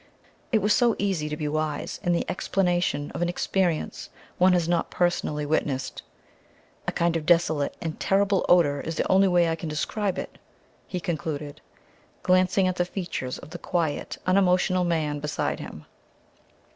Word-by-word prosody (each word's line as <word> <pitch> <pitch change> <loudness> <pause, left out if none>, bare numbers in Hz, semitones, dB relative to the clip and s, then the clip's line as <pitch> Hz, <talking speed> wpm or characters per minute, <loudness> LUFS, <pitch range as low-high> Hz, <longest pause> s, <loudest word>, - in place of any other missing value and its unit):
It 220 -5 +2
was 210 0 +4
so 235 0 +3
easy 185 -7 -1
to 150 - -4
be 150 - -2
wise 155 0 -2
in 175 - 0
the 170 - +1
explanation 175 -6 0
of - - -5
an 175 - +1
experience 175 -2 -1 0.3
one 185 +1 +6
has 175 -2 +2
not 170 -1 +1
personally 165 -4 0
witnessed. 145 -3 -1 0.9
"A - - +1
kind 170 0 +1
of 165 - -1
desolate 160 -4 +2
and 160 -2 -4
terrible 195 0 +2
odor 145 -6 +4
is 165 - -4
the - - 0
only 195 +1 +5
way 175 -2 +4
I 165 - 0
can 165 0 -6
describe 190 +6 -2
it," - - -6 0.5
he 180 - -3
concluded, 155 -4 -4 0.6
glancing 185 +1 +3
at 185 0 -1
the 175 - +3
features 175 -9 -4
of 155 - -12
the 175 - -7
quiet, 165 -5 -2
unemotional 185 -1 +3
man 155 -4 0
beside 150 0 -2
him. 75 - -9
175 Hz, 165 wpm, -26 LUFS, 155-185 Hz, 0.9 s, one